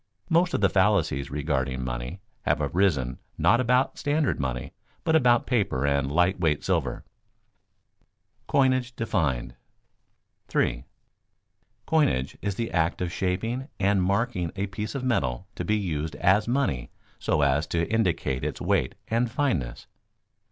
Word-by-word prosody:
Most 175 +2 +3
of - - -1
the 100 - +6
fallacies 95 -9 +2
regarding 70 -3 -1
money - - -5 0.2
have - - +1
arisen 75 -10 +1 0.2
not 120 +4 +4
about 130 +6 +2
standard 150 -1 +1
money, 65 0 -3 0.3
but 160 - +2
about 120 -5 +4
paper 100 - 0
and 70 -1 +1
light 90 +4 +2
weight 80 -4 +1
silver. 80 -10 -1 0.9
[Sidenote: - - -44
Coinage 130 -2 +2
defined] 80 - -1 0.9
3. - - 0 1.0
_Coinage 70 - +2
is 100 -1 -2
the 115 +2 -3
act 80 0 +1
of 90 -1 -2
shaping 115 +8 -2
and 100 0 +3
marking 100 -2 0
a 100 +1 -1
piece 105 +5 -5
of 135 - -3
metal 80 - 0
to - - -4
be 110 0 +1
used 80 -6 -3
as 100 +4 +3
money 120 - 0 0.3
so - - +1
as 70 +2 +2
to 85 +2 0
indicate 85 - 0
its - - -3
weight - - 0
and 115 +2 +1
fineness. 100 - -1
95 Hz, 140 wpm, -26 LUFS, 70-120 Hz, 1.0 s, the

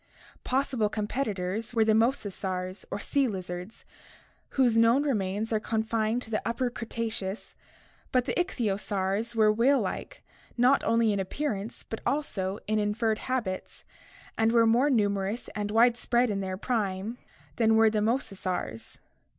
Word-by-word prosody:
Possible 255 -5 0
competitors 210 -1 -2
were 225 -1 +4
the 220 - +4
mosasaurs 200 -5 -1
or - - -3
sea 275 +6 +1
lizards, 185 0 -6 0.7
whose 250 -4 +4
known 230 +5 +5
remains 215 -4 -1
are 215 - +2
con 220 0 -1
fined 225 +2 0
to 225 - -10
the 215 - 0
Upper 245 +1 -1
Cretaceous, 225 -3 -4 0.6
but 250 -1 +2
the - - -1
ichthyosaurs 210 - -1
were 215 -1 +5
whale 255 +6 +4
like, - - -5 0.3
not 250 +3 +4
only 230 -2 +3
in 200 - -1
appearance 210 +1 -3
but 225 - -6
also 200 -10 -1
in 215 0 +1
inferred 215 +1 0
habits, 230 -8 -3 0.6
and 225 0 +4
were 230 -1 +5
more 240 +6 +4
numerous 205 -2 0
and 205 -1 -3
widespread 240 +1 +3
in 200 - -1
their 190 -1 -3
prime 215 0 -2 0.4
than 225 -1 +4
were 220 0 +5
the 215 -1 0
mosa 225 -1 0
saurs. 180 -12 -4
220 Hz, 145 wpm, -28 LUFS, 200-240 Hz, 0.7 s, known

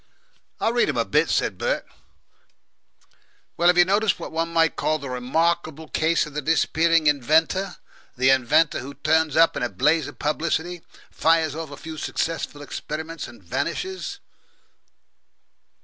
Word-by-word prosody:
"I - - +1
read 240 0 +2
'em - - -2
a - - +1
bit," - - +2
said - - 0
Bert. - - -1 1.7
"Well, 170 - +2
have 180 0 +5
you 175 - +7
noticed 200 +1 +1
what - - -7
one 165 +1 -2
might 165 -1 +2
call 155 - 0
the 140 -4 -7
remarkable 160 +4 -1
case 165 +2 +1
of 150 - -11
the 150 - -3
disappearing 160 +1 +2
inventor 160 +6 +2 0.4
the 130 +1 +4
inventor 135 +4 +3
who 140 +3 -8
turns 155 +1 +1
up 165 0 +5
in - - -3
a 125 - 0
blaze 150 +2 +1
of - - -10
publicity, 165 +3 -2 0.3
fires 160 -2 +2
off 160 0 -6
a 140 - -9
few 160 -1 -8
successful 150 -1 -3
experiments, 160 +2 -6
and 120 -4 -15
vanishes?" 365 - -4
160 Hz, 150 wpm, -23 LUFS, 145-170 Hz, 1.7 s, you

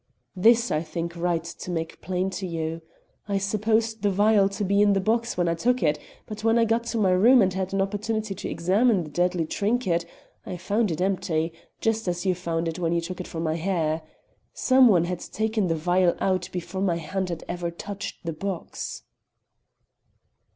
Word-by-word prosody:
"This 230 +5 +4
I 155 - +1
think 170 +1 -5
it - - -9
right 170 -1 0
to 170 +1 -8
make 165 -2 -4
plain 185 +1 -1
to 190 0 -4
you. 165 -1 -3 0.5
I 200 -1 0
supposed 220 +3 0
the 205 - +2
vial 200 0 +4
to 200 +1 -4
be 200 +2 +3
in 205 -1 +5
the 195 - +2
box 230 +3 0
when 175 -1 +2
I 170 - +2
took 245 +6 +1
it, 150 -1 +2 0.3
but 215 0 -8
when 225 +1 +4
I 230 - +4
got 230 +1 +1
to 235 - -2
my 195 -4 +3
room 230 +8 +6
and 190 -4 +3
had 190 0 -2
an 195 0 +2
opportunity 215 +1 -2
to 195 - -6
examine 190 +4 +2
the 155 - -10
deadly 175 0 +1
trinket, 200 -2 0 0.4
I 180 - -6
found 205 +5 0
it 160 0 -3
empty, 170 -4 0 0.3
just 225 -2 0
as 175 +1 -2
you 185 - +3
found 170 -2 -2
it 165 +1 -4
when 170 -1 0
you 170 - +1
took 180 +2 -5
it - - -8
from 165 0 -4
my 160 0 0
hair. 165 -3 0 0.5
Some 260 -1 +5
one 180 -7 +5
had 180 0 -3
taken 220 -1 -1
the 165 - +1
vial 175 +2 +2
out 185 -2 0
before 185 +1 -4
my 185 -3 +2
hand 185 +3 -3
had 170 -2 -5
ever 175 -1 -3
touched 200 +3 -7
the 165 - -2
box." 190 +1 -5
185 Hz, 205 wpm, -25 LUFS, 170-210 Hz, 0.5 s, room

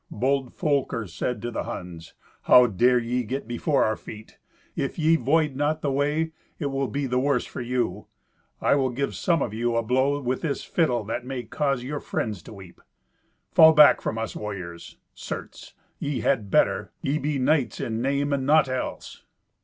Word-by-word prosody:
Bold 130 +3 -1
Folker 140 -8 -1
said 105 +6 -4
to 120 - -3
the - - -3
Huns, 85 -3 -8 0.3
"How 125 - +8
dare 120 +3 +3
ye 120 +1 -1
get 130 +2 -4
before 135 +4 +1
our 110 - 0
feet? 110 +1 -12 0.4
If 135 - -3
ye 160 0 +4
void 150 0 +1
not 150 +3 -1
the 140 - 0
way, 150 +4 0 0.3
it 145 -3 -3
will 135 0 -1
be 140 +2 -2
the 125 -1 0
worse 135 -1 +1
for - - -7
you. 120 -5 -2 0.5
I - - +3
will 135 -2 +2
give 135 +3 -2
some 170 -2 +1
of 110 - -4
you 120 +1 -1
a 115 - +1
blow 130 +5 +1
with 130 -1 -2
this 145 -4 -2
fiddle 125 -9 0
that 115 +3 -4
may 130 -1 -5
cause 135 +2 -1
your 145 +3 -4
friends 105 -9 -3
to - - -12
weep. 95 -4 -13 0.7
Fall 160 0 +8
back 150 -1 +7
from 110 - -3
us 115 0 -4
warriors. 90 -5 -7 0.2
Certes, - - -8 0.2
ye 145 -2 -2
had 110 -8 0
better. - - +2
Ye 145 +3 0
be 150 0 -1
knights 135 0 +1
in 115 0 -3
name 140 +2 0
and 135 -1 0
naught 145 0 +4
else." 130 0 -5
130 Hz, 185 wpm, -25 LUFS, 115-145 Hz, 0.7 s, How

